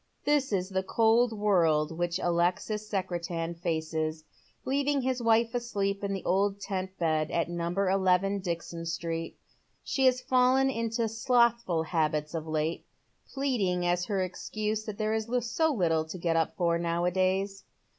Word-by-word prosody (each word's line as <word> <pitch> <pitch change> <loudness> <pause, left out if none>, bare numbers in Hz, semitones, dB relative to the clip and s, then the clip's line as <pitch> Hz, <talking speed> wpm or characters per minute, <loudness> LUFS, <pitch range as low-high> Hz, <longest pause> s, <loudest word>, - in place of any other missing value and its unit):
This 290 -3 +2
is 185 -2 0
the 190 -1 0
cold 225 +4 +3
world 170 -8 +2
which 175 +1 -1
Alexis 180 +5 0
Secretan 175 -4 -2
faces, 160 -2 -2 0.4
leaving 280 +1 +1
hift 255 -1 -1
wife 230 0 +3
asleep 200 -5 -2
in 200 - -1
the 195 -1 -4
old 200 +2 +1
tent 190 -1 -4
bed 155 -2 +1
at 170 0 -1
number 175 +3 -1
eleven, 190 +1 +2
Dixon 170 -2 -4
Street. 165 0 -4 0.5
She 265 -1 +2
has 255 -1 +3
fallen 255 +1 +3
into 230 -1 -1
slothful 235 -6 +2
habits 155 -2 -1
of 160 -1 -4
late, 155 +1 -2 0.4
pleading 210 -11 0
as 175 0 +1
her 195 -3 0
excuse 215 +4 -3
that 215 -2 -6
there 215 0 0
is 220 0 -1 0.2
so 320 +7 +1
little 165 - +1
to 160 +4 -7
get 170 -1 0
up 165 -1 +1
for, 170 -2 +1
now 170 0 0
a 180 - +2
days. 190 +2 0
190 Hz, 155 wpm, -29 LUFS, 170-225 Hz, 0.5 s, cold